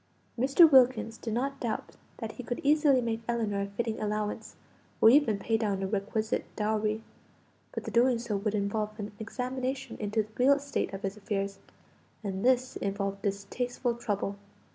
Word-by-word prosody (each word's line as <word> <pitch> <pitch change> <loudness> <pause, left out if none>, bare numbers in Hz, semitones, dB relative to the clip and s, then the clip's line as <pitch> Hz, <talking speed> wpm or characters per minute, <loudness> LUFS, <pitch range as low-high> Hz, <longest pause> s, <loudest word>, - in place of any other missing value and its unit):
Mr. 270 +7 +6
Wilkins 255 -3 +5
did 225 -2 -3
not 275 +3 -1
doubt 230 -3 -3 0.3
that 225 -1 -5
he 250 - -8
could 245 +1 -3
easily 290 -2 +4
make 230 -1 -2
Ellinor 220 -4 0
a 200 - -2
fitting 220 +2 -3
allowance, 210 0 -3 0.4
or 225 - +8
even 250 -6 +4
pay 225 +3 0
down 200 -3 -1
a - - 0
requisite 215 +3 -1
dowry; 215 0 0 0.7
but - - -5
the - - -5
doing 245 +1 +4
so 230 -2 -3
would 205 +1 -1
involve 210 +1 -1
an 210 -1 -5
examination 255 +3 -3
into 215 +1 0
the 210 - -17
real 275 +3 +6
state 280 -6 -2
of 195 0 -7
his 195 +1 -3
affairs, 200 -2 -3 0.6
and 195 -2 -3
this 255 0 +2
involved 200 0 -2
distasteful 235 +5 -2
trouble. 205 -4 -2
220 Hz, 165 wpm, -29 LUFS, 205-250 Hz, 0.7 s, or